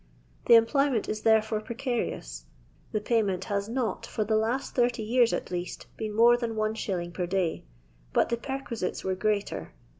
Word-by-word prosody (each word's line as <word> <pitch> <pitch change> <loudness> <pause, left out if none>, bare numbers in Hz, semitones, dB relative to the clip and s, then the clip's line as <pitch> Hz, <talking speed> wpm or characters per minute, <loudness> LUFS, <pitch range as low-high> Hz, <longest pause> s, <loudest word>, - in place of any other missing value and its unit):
The 235 - +9
employment 240 +1 +3
is 215 0 -3
therefore 220 -1 +3
precarious; 230 - -3 0.5
tho 215 - -1
payment 205 -5 +1
has 200 +1 -2
not, 235 -5 -2
for 215 - -1
the 215 +1 +2
hut 245 +5 0
30 240 -2 0
years 235 +2 +3
at - - -3
least, 175 0 -4
been 215 -1 -4
more 235 +2 +7
than 235 -2 -3
1*. 205 -5 -2
per 180 0 -2
day, 180 - -1 0.5
but - - +2
the 235 - 0
perquisites 240 -6 -4
were 190 - 0
greater. 200 - -2
220 Hz, 160 wpm, -28 LUFS, 195-235 Hz, 0.5 s, The